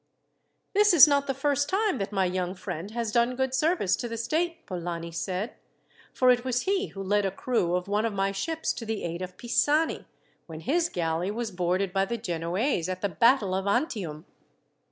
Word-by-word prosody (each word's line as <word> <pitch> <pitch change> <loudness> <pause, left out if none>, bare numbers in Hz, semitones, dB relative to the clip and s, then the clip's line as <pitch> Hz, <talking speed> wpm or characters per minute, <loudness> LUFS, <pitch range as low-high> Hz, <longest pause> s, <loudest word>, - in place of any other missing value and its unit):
"This 415 -2 +5
is 305 -2 +10
not 280 -1 +2
the 270 - 0
first 285 +1 0
time 400 - +1
that 195 +1 -3
my 195 -2 +1
young 180 0 -2
friend 180 0 -6
has 230 -1 -3
done 235 +2 +2
good 265 0 -1
service 300 - +2
to 240 - -4
the 230 0 -5
state," 325 +9 -1
Polani 170 -2 -5
said; 185 +6 -3 0.6
"for 255 -1 +4
it 245 -1 +2
was 250 -1 0
he 395 +1 0
who 195 - -7
led 205 +2 +2
a 195 - +1
crew 185 -5 0
of 180 +1 -2
one 205 +2 +1
of 225 - 0
my 195 -1 0
ships 320 +12 -2
to 230 - -7
the 220 -2 -3
aid 170 +1 -4
of 185 0 -7
Pisani, 295 +6 +1 0.4
when 160 -1 -8
his 330 - +1
galley 165 +1 -1
was 225 +1 -3
boarded 180 +1 -1
by 195 0 +2
the 235 +4 -3
Genoese, 180 - -1
at 185 0 -4
the 200 - 0
battle 205 - +3
of 190 +1 -1
Antium." 200 - -1
210 Hz, 200 wpm, -27 LUFS, 180-265 Hz, 0.6 s, is